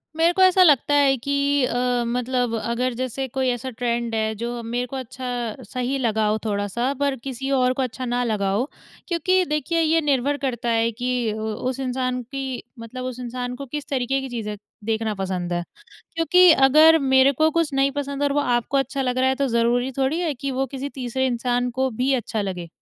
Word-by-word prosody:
मेरे 330 Hz, +2 st, +3 dB
को 380 Hz, -, +1 dB
ऐसा 370 Hz, 0 st, +6 dB
लगता 290 Hz, -3 st, +4 dB
है 280 Hz, -2 st, +4 dB
कि 280 Hz, +2 st, +1 dB
अ, 245 Hz, 0 st, 0 dB
मतलब 245 Hz, 0 st, -1 dB
अगर 235 Hz, +3 st, -1 dB
जैसे 255 Hz, +2 st, -3 dB
कोई 260 Hz, +1 st, -1 dB
ऐसा 245 Hz, +1 st, -3 dB
ट्रेंड 235 Hz, -1 st, -2 dB
है 220 Hz, 0 st, 0 dB
जो 235 Hz, +2 st, -4 dB
मेरे 240 Hz, +2 st, -2 dB
को 270 Hz, -, -8 dB
अच्छा 245 Hz, -3 st, -4 dB
सही 250 Hz, +5 st, -2 dB
लगा 220 Hz, -4 st, +1 dB
हो 210 Hz, +1 st, +1 dB
थोड़ा-सा 210 Hz, +5 st, -1 dB
पर 280 Hz, -1 st, +1 dB
किसी 270 Hz, 0 st, -4 dB
और 255 Hz, -2 st, +3 dB
को 265 Hz, -, -2 dB
अच्छा 255 Hz, 0 st, -3 dB
ना 245 Hz, 0 st, 0 dB
लगा 210 Hz, -4 st, 0 dB
हो 240 Hz, +9 st, 0 dB, 0.4 s
क्योंकि 370 Hz, +2 st, +2 dB
देखिए 300 Hz, +2 st, -1 dB
ये 325 Hz, 0 st, +3 dB
निर्भर 285 Hz, -1 st, +1 dB
करता 240 Hz, -2 st, -2 dB
है 230 Hz, 0 st, +2 dB
कि 245 Hz, +3 st, -4 dB, 0.2 s
उ 215 Hz, -, -6 dB, 0.3 s
उस 260 Hz, -, -5 dB
इंसान 255 Hz, -1 st, -2 dB
की 265 Hz, 0 st, -5 dB, 0.2 s
मतलब 230 Hz, +3 st, -7 dB
उस 255 Hz, -1 st, -5 dB
इंसान 245 Hz, 0 st, -4 dB
को 275 Hz, -, -7 dB
किस 290 Hz, +2 st, -6 dB
तरीके 270 Hz, 0 st, 0 dB
की 265 Hz, -, -6 dB
चीज़ें 220 Hz, -3 st, -4 dB, 0.3 s
देखना 220 Hz, -1 st, -1 dB
पसंद 185 Hz, -2 st, -3 dB
है। 175 Hz, 0 st, -1 dB, 0.5 s
क्योंकि 360 Hz, +2 st, +5 dB
अगर 310 Hz, +4 st, +6 dB
मेरे 265 Hz, -1 st, +4 dB
को 310 Hz, +4 st, +2 dB
कुछ 330 Hz, -2 st, 0 dB
नहीं 270 Hz, 0 st, +3 dB
पसंद 280 Hz, 0 st, -3 dB
और 285 Hz, -1 st, +2 dB
वो 290 Hz, -, +2 dB
आपको 245 Hz, 0 st, 0 dB
अच्छा 270 Hz, 0 st, 0 dB
लग 250 Hz, -1 st, -1 dB
रहा 260 Hz, 0 st, +3 dB
है 265 Hz, -, +2 dB
तो 280 Hz, 0 st, +1 dB
ज़रूरी 240 Hz, +2 st, +1 dB
थोड़ी 270 Hz, +5 st, +1 dB
है 335 Hz, -4 st, 0 dB
कि 275 Hz, +2 st, -4 dB
वो 265 Hz, +1 st, -1 dB
किसी 270 Hz, +2 st, -5 dB
तीसरे 260 Hz, 0 st, -1 dB
इंसान 245 Hz, 0 st, 0 dB
को 260 Hz, +2 st, 0 dB
भी 255 Hz, +4 st, 0 dB
अच्छा 225 Hz, -3 st, -2 dB
लगे? 180 Hz, -3 st, -5 dB
255 Hz, 210 wpm, -23 LUFS, 235-275 Hz, 0.5 s, ऐसा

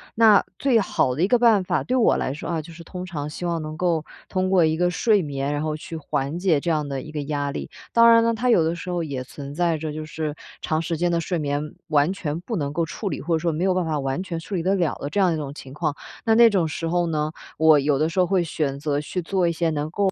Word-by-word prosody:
那 220 Hz, -3 st, +6 dB, 0.2 s
最 260 Hz, -5 st, +3 dB
好 130 Hz, -10 st, +1 dB
的 160 Hz, -, 0 dB
一 -, -, +4 dB
个 240 Hz, +2 st, +3 dB
办 225 Hz, -5 st, +5 dB
法， -, -, 0 dB
对 255 Hz, -, -1 dB
我 235 Hz, -, +4 dB
来 -, -, -1 dB
说 145 Hz, -, -7 dB
啊， 165 Hz, -2 st, -1 dB
就 160 Hz, +2 st, -12 dB
是 170 Hz, +1 st, -11 dB
通 180 Hz, +2 st, -7 dB
常 150 Hz, -5 st, -5 dB
希 155 Hz, -, -8 dB
望 170 Hz, -1 st, -1 dB
能 155 Hz, 0 st, -6 dB
够 170 Hz, -3 st, 0 dB, 0.2 s
通 185 Hz, -1 st, 0 dB
过 185 Hz, -2 st, +4 dB
一 155 Hz, 0 st, +1 dB
个 175 Hz, +1 st, +2 dB
睡 205 Hz, +3 st, +3 dB
眠， 140 Hz, -1 st, -3 dB
然 145 Hz, -, -2 dB
后 155 Hz, -1 st, -1 dB
去 155 Hz, +2 st, -8 dB
缓 140 Hz, 0 st, -2 dB
解 175 Hz, -5 st, +2 dB
这 170 Hz, -, -3 dB
样 155 Hz, -3 st, 0 dB
的 135 Hz, -1 st, -3 dB
一 155 Hz, -, -10 dB
个 150 Hz, -1 st, -3 dB
压 145 Hz, -1 st, -2 dB
力。 140 Hz, -, -5 dB, 0.3 s
当 230 Hz, 0 st, +7 dB
然 230 Hz, 0 st, +6 dB
呢， 230 Hz, 0 st, +2 dB
它 250 Hz, +3 st, 0 dB
有 175 Hz, -, +5 dB
的 165 Hz, +2 st, 0 dB
时 175 Hz, -, -7 dB
候 175 Hz, -1 st, -1 dB
也 135 Hz, -4 st, -4 dB
存 140 Hz, +2 st, -9 dB
在 170 Hz, -1 st, +1 dB
着， 155 Hz, 0 st, -4 dB
就 155 Hz, +1 st, -5 dB
是， 155 Hz, -1 st, -4 dB, 0.3 s
长 155 Hz, -, 0 dB
时 165 Hz, +1 st, -2 dB
间 175 Hz, +2 st, 0 dB
的 170 Hz, -, +1 dB
睡 165 Hz, +1 st, -2 dB
眠 145 Hz, +1 st, -2 dB
完 155 Hz, +2 st, +2 dB
全 160 Hz, -5 st, -4 dB
不 225 Hz, +5 st, -4 dB
能 145 Hz, -6 st, -2 dB
够 165 Hz, +2 st, 0 dB
处 200 Hz, +5 st, -4 dB
理， -, -, -4 dB
或 165 Hz, +5 st, -2 dB
者 160 Hz, -, +2 dB
说 170 Hz, +1 st, 0 dB
没 160 Hz, +3 st, -2 dB
有 190 Hz, -1 st, +3 dB
办 185 Hz, 0 st, 0 dB
法 155 Hz, -3 st, -1 dB
完 135 Hz, +4 st, -2 dB
全 175 Hz, -3 st, -4 dB
处 165 Hz, -, -9 dB
理 180 Hz, -, 0 dB
得 190 Hz, +4 st, +1 dB
了 175 Hz, -5 st, +1 dB
的 145 Hz, -, -3 dB
这 205 Hz, -, -1 dB
样 190 Hz, -2 st, +4 dB
的 165 Hz, -, 0 dB
一 -, -, -3 dB
种 140 Hz, -2 st, -5 dB
情 135 Hz, -3 st, -10 dB
况， 145 Hz, 0 st, -2 dB, 0.3 s
那 225 Hz, -, +3 dB
那 235 Hz, +1 st, +8 dB
种 180 Hz, -5 st, +2 dB
时 165 Hz, +1 st, -4 dB
候 175 Hz, +1 st, +1 dB
呢， 155 Hz, -1 st, -1 dB, 0.3 s
我 160 Hz, -2 st, +6 dB
有 140 Hz, 0 st, +1 dB
的 155 Hz, +3 st, +2 dB
时 165 Hz, -, -2 dB
候 180 Hz, -, +4 dB
会 190 Hz, -2 st, +2 dB
选 145 Hz, -4 st, -2 dB
择 145 Hz, -1 st, -1 dB
去 165 Hz, +5 st, -4 dB
做 180 Hz, +1 st, +1 dB
一 -, -, +2 dB
些 165 Hz, 0 st, 0 dB
能 150 Hz, 0 st, -2 dB
够 195 Hz, +3 st, +1 dB
165 Hz, 320 characters per minute, -23 LUFS, 150-180 Hz, 0.3 s, 那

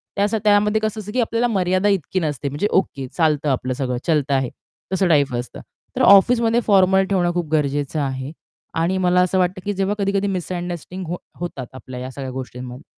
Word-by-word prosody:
त्या 205 Hz, +2 st, +1 dB
त्यामध्ये 210 Hz, +1 st, +3 dB
कसं 215 Hz, 0 st, -2 dB
असतं 210 Hz, 0 st, -8 dB
की 255 Hz, -, +2 dB
आपल्याला 230 Hz, +1 st, +1 dB
मर्यादा 185 Hz, -2 st, +1 dB
इतकी 190 Hz, -1 st, 0 dB
नसते 145 Hz, -5 st, -2 dB
म्हणजे 145 Hz, +9 st, -1 dB
ओके 140 Hz, -8 st, 0 dB
चालतं 155 Hz, -3 st, +2 dB
आपलं 130 Hz, -1 st, -1 dB
सगळं. 125 Hz, -1 st, -2 dB
चलता 145 Hz, -4 st, +2 dB
है. 130 Hz, -2 st, -2 dB, 0.4 s
तसं 190 Hz, 0 st, +2 dB
टाइप 145 Hz, -5 st, +3 dB
असतं. 120 Hz, 0 st, -5 dB, 0.3 s
तर -, -, -1 dB
ऑफिसमध्ये 230 Hz, +3 st, +5 dB
फॉर्मल 190 Hz, -1 st, +5 dB
ठेवणं 175 Hz, -3 st, +1 dB
खूप 175 Hz, -3 st, -2 dB
गरजेचं 145 Hz, 0 st, 0 dB
आहे. 130 Hz, 0 st, -3 dB, 0.4 s
आणि 170 Hz, +3 st, 0 dB
मला 180 Hz, -1 st, +3 dB
असं 180 Hz, +1 st, +1 dB
वाटतं 185 Hz, +1 st, 0 dB
की 205 Hz, -, -1 dB
जेव्हा 195 Hz, +1 st, -1 dB
कधी-कधी 200 Hz, 0 st, 0 dB
मिसअंडरस्टँडिंग 180 Hz, -1 st, -4 dB
हो 175 Hz, +2 st, -3 dB, 0.2 s
होतात 165 Hz, -8 st, -5 dB
आपल्या 130 Hz, -1 st, -9 dB
ह्या 130 Hz, +1 st, -6 dB
सगळ्या 135 Hz, -1 st, -6 dB
गोष्टींमध्ये. 125 Hz, 0 st, -7 dB
175 Hz, 185 wpm, -21 LUFS, 140-195 Hz, 0.4 s, ऑफिसमध्ये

